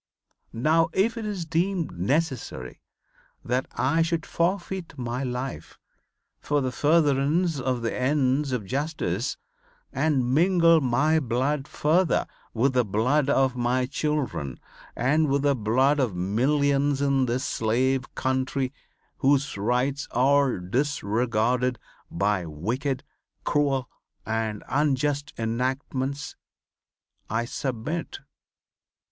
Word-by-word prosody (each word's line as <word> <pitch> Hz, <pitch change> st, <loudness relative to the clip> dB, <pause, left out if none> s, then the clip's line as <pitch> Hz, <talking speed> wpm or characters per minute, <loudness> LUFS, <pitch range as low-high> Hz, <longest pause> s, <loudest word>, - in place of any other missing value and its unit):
Now 160 Hz, +7 st, +3 dB
if 225 Hz, +5 st, +2 dB
it 225 Hz, -2 st, -4 dB
is 195 Hz, -5 st, -3 dB
deemed 170 Hz, +2 st, 0 dB
necessary 125 Hz, -, -2 dB, 0.6 s
that 125 Hz, +2 st, 0 dB
I 160 Hz, +5 st, +1 dB
should 165 Hz, 0 st, 0 dB
forfeit 180 Hz, -2 st, -2 dB
my 125 Hz, +1 st, -3 dB
life 125 Hz, +1 st, -5 dB, 0.6 s
for 145 Hz, 0 st, 0 dB
the 130 Hz, -2 st, -1 dB
furtherance 150 Hz, +2 st, +2 dB
of 130 Hz, -2 st, -1 dB
the 115 Hz, -, -1 dB
ends 135 Hz, +1 st, +1 dB
of 120 Hz, -5 st, -2 dB
justice, 130 Hz, -, -2 dB, 0.6 s
and 130 Hz, -5 st, +1 dB
mingle 165 Hz, 0 st, +5 dB
my 145 Hz, +5 st, +2 dB
blood 135 Hz, +2 st, -1 dB
further 165 Hz, +4 st, +2 dB, 0.3 s
with 130 Hz, +4 st, +1 dB
the 125 Hz, -1 st, +3 dB
blood 125 Hz, +8 st, +1 dB
of 135 Hz, -2 st, +2 dB
my 125 Hz, +1 st, +1 dB
children 140 Hz, -, -2 dB, 0.4 s
and 150 Hz, +5 st, +2 dB
with 140 Hz, 0 st, +1 dB
the 140 Hz, -1 st, +3 dB
blood 130 Hz, +6 st, +2 dB
of 120 Hz, -9 st, 0 dB
millions 140 Hz, +8 st, +1 dB
in 140 Hz, -2 st, +2 dB
this 125 Hz, +3 st, -1 dB
slave 130 Hz, +3 st, 0 dB
country 130 Hz, 0 st, -1 dB, 0.4 s
whose 140 Hz, 0 st, +2 dB
rights 125 Hz, +7 st, 0 dB
are 135 Hz, 0 st, +3 dB
disregarded 120 Hz, +3 st, 0 dB, 0.3 s
by 100 Hz, -1 st, 0 dB
wicked, 125 Hz, -, -2 dB, 0.4 s
cruel 140 Hz, -3 st, +1 dB, 0.4 s
and 110 Hz, -1 st, -2 dB
unjust 145 Hz, +2 st, 0 dB
enactments, 130 Hz, +4 st, -2 dB, 0.9 s
I 115 Hz, +2 st, 0 dB
submit. 135 Hz, +6 st, -4 dB
135 Hz, 110 wpm, -26 LUFS, 120-150 Hz, 0.9 s, mingle